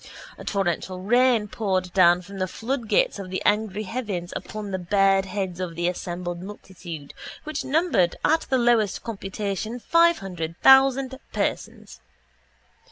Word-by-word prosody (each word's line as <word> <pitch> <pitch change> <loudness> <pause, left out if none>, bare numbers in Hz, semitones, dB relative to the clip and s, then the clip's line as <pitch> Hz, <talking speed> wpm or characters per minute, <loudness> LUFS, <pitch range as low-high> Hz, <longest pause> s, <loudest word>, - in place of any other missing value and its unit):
A - - -11
torrential 185 -1 -2
rain 240 +2 +3
poured 185 -4 -2
down 180 -1 +5
from 195 +2 -10
the 185 - 0
floodgates 260 - 0
of 190 -2 -7
the 185 - -2
angry 210 0 +1
heavens 200 -5 -4
upon 215 -2 -6
the 190 - -2
bared 195 +1 +3
heads 190 -2 -4
of 180 -3 -4
the 175 +1 -1
assembled 175 0 -4
multitude 175 -6 -9 0.3
which 310 0 -4
numbered 290 - +2
at 320 +1 +3
the 265 - +3
lowest 235 -5 +2
computation 210 +1 -4
five 335 +6 +4
hundred 165 -4 -6
thousand 265 0 +5
persons. - - -4
195 Hz, 140 wpm, -24 LUFS, 180-240 Hz, 0.3 s, down